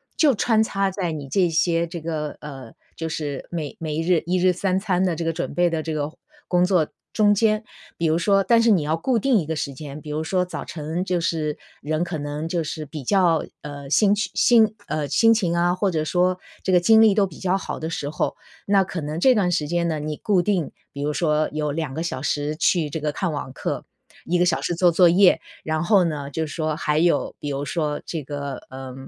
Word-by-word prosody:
就 295 Hz, -4 st, +4 dB
穿 220 Hz, +1 st, +2 dB
插 195 Hz, -2 st, 0 dB
在 185 Hz, -3 st, -3 dB
你 145 Hz, -3 st, -6 dB
这 180 Hz, +4 st, +2 dB
些 165 Hz, +1 st, +2 dB
这 170 Hz, 0 st, -7 dB
个， 155 Hz, -2 st, -4 dB
呃 135 Hz, -6 st, -9 dB, 0.2 s
就 165 Hz, 0 st, -4 dB
是 145 Hz, -3 st, -4 dB
每 160 Hz, -4 st, -4 dB
每 155 Hz, 0 st, -2 dB
日 170 Hz, 0 st, +2 dB
1 180 Hz, +2 st, +1 dB
日 180 Hz, 0 st, +4 dB
3 185 Hz, +1 st, 0 dB
餐 190 Hz, -2 st, 0 dB
的 180 Hz, -3 st, +1 dB
这 170 Hz, -, -3 dB
个 165 Hz, -, 0 dB
准 -, -, -4 dB
备 175 Hz, 0 st, +3 dB
的 160 Hz, -2 st, -2 dB
这 160 Hz, -, -3 dB
个 150 Hz, +1 st, -3 dB, 0.3 s
工 180 Hz, -1 st, +3 dB
作 180 Hz, -5 st, +2 dB, 0.3 s
中 205 Hz, -1 st, +4 dB
间。 215 Hz, +1 st, +2 dB, 0.3 s
比 170 Hz, -, -1 dB
如 155 Hz, -, +2 dB
说 195 Hz, +2 st, +3 dB
但 230 Hz, +1 st, +4 dB
是 230 Hz, -1 st, +4 dB
你 180 Hz, -6 st, +4 dB
要 155 Hz, +2 st, 0 dB
固 235 Hz, +6 st, +1 dB
定 255 Hz, 0 st, +3 dB
一 160 Hz, -, -3 dB
个 160 Hz, +1 st, -3 dB
时 140 Hz, -2 st, -3 dB
间。 145 Hz, +1 st, -8 dB
比 150 Hz, -, -10 dB
如 155 Hz, +1 st, -2 dB
说， 180 Hz, +2 st, 0 dB
早 180 Hz, -, -6 dB
晨 160 Hz, +3 st, -4 dB
就 180 Hz, -2 st, 0 dB
是 155 Hz, -3 st, -1 dB, 0.2 s
人 155 Hz, +2 st, -1 dB
可 175 Hz, -2 st, -4 dB
能 145 Hz, +2 st, -4 dB
就 170 Hz, -1 st, -1 dB
是 155 Hz, 0 st, -5 dB
比 150 Hz, -1 st, -8 dB
较， 175 Hz, 0 st, +2 dB, 0.2 s
呃 145 Hz, -1 st, -8 dB
心 205 Hz, +7 st, +4 dB
情， 220 Hz, +1 st, +3 dB
呃 150 Hz, -1 st, -2 dB
心 225 Hz, +7 st, +4 dB
情 180 Hz, -6 st, 0 dB
啊， 175 Hz, +1 st, +2 dB
或 190 Hz, +1 st, 0 dB
者 155 Hz, -3 st, 0 dB
说 180 Hz, +2 st, +1 dB, 0.2 s
这 190 Hz, -, 0 dB
个 180 Hz, -, +6 dB
精 220 Hz, +5 st, +6 dB
力 220 Hz, -2 st, +6 dB
都 205 Hz, -2 st, +3 dB
比 160 Hz, -, -13 dB
较 190 Hz, +1 st, +1 dB
好 -, -, -5 dB
的 160 Hz, -, -4 dB
时 145 Hz, -3 st, -3 dB
候。 -, -, -2 dB, 0.3 s
那 195 Hz, -1 st, +4 dB
可 180 Hz, -2 st, -5 dB
能 150 Hz, +2 st, -4 dB
这 260 Hz, +6 st, +5 dB
段 185 Hz, -4 st, +2 dB
时 150 Hz, -3 st, 0 dB
间 170 Hz, +1 st, 0 dB
呢， 155 Hz, -2 st, -1 dB
你 150 Hz, 0 st, -4 dB
固 195 Hz, -4 st, +2 dB
定 180 Hz, -5 st, 0 dB, 0.2 s
比 140 Hz, -, -6 dB
如 150 Hz, +1 st, 0 dB
说 155 Hz, -1 st, +1 dB
有 150 Hz, -1 st, -1 dB
2 150 Hz, -3 st, -3 dB
个 160 Hz, -, -3 dB
小 150 Hz, -6 st, -3 dB
时 150 Hz, +1 st, -1 dB
去 165 Hz, -1 st, +1 dB
这 160 Hz, +3 st, -4 dB
个 150 Hz, 0 st, -1 dB
看 180 Hz, +1 st, -2 dB
网 145 Hz, -3 st, -5 dB
课， -, -, -4 dB, 0.4 s
1 175 Hz, +1 st, +1 dB
个 180 Hz, -, +4 dB
小 170 Hz, -, +1 dB
时 175 Hz, -, -1 dB
做 175 Hz, +1 st, +4 dB
作 175 Hz, +1 st, +5 dB
业， 185 Hz, +1 st, +5 dB, 0.2 s
然 155 Hz, +1 st, -1 dB
后 200 Hz, 0 st, +4 dB
呢， 145 Hz, -3 st, -3 dB
就 160 Hz, +2 st, -2 dB
是 145 Hz, -, -8 dB
说 155 Hz, -1 st, -1 dB
还 150 Hz, 0 st, 0 dB
有 170 Hz, -3 st, +1 dB
比 145 Hz, -, -4 dB
如 140 Hz, +1 st, -3 dB
说 150 Hz, 0 st, -2 dB
这 160 Hz, -4 st, -4 dB
个， 140 Hz, -1 st, -5 dB
呃 130 Hz, -1 st, -8 dB
165 Hz, 250 characters per minute, -23 LUFS, 150-185 Hz, 0.4 s, 个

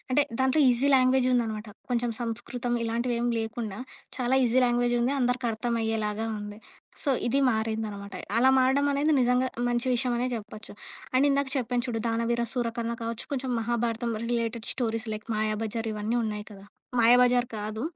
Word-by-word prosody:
అంటే 290 Hz, +3 st, +4 dB, 0.2 s
దాంట్లో 265 Hz, +4 st, +3 dB
ఈజీ 250 Hz, +3 st, +3 dB
లాంగ్వేజుందనమాట. 250 Hz, -4 st, +2 dB, 0.2 s
కొంచుం 240 Hz, -1 st, +1 dB
సంస్కృతం 240 Hz, +1 st, -3 dB
ఇలాంటివేమి 235 Hz, +1 st, 0 dB
లేకుండా 225 Hz, -2 st, -4 dB, 0.4 s
చాలా 255 Hz, 0 st, +1 dB
ఈజీ 245 Hz, +2 st, +3 dB
లాంగ్వేజుంది, 240 Hz, +1 st, +2 dB
అందరికి 250 Hz, 0 st, 0 dB
అర్థమయ్యేలాగా 225 Hz, -1 st, -1 dB
ఉంది. 205 Hz, 0 st, -8 dB, 0.5 s
సో, 280 Hz, -, +2 dB, 0.2 s
ఇది 275 Hz, +4 st, +2 dB
మారిందనమాట. 220 Hz, -3 st, -3 dB, 0.2 s
అలా 260 Hz, +3 st, +6 dB
మారడమనేది 280 Hz, +3 st, +3 dB
నిజంగా 250 Hz, +1 st, +2 dB, 0.2 s
మంచి 240 Hz, +1 st, 0 dB
విషయమే 245 Hz, 0 st, 0 dB
జెప్పొచ్చు. 215 Hz, -1 st, -8 dB, 0.4 s
అండ్ 270 Hz, +3 st, +4 dB
ఇందాక 280 Hz, 0 st, +1 dB
చెప్పాను 245 Hz, -1 st, 0 dB
చూడు 225 Hz, -2 st, -2 dB
'దానవీరసూరకర్ణ' 235 Hz, 0 st, -1 dB
కావచ్చు, 230 Hz, 0 st, -4 dB
కొంచం 260 Hz, -1 st, -2 dB
Mahabharatam 235 Hz, 0 st, -1 dB
related 230 Hz, -1 st, -2 dB
stories 225 Hz, -2 st, -2 dB
like 215 Hz, +1 st, -8 dB
'Mayabazar' 220 Hz, +1 st, -2 dB
ఇవ్వని 215 Hz, +3 st, -1 dB
ఉన్నాయి 210 Hz, -1 st, -4 dB
కదా! 195 Hz, -1 st, -13 dB, 0.4 s
'మాయాబజార్' 245 Hz, +1 st, +5 dB
కాదు. 215 Hz, +3 st, -4 dB
235 Hz, 135 wpm, -27 LUFS, 225-250 Hz, 0.5 s, అలా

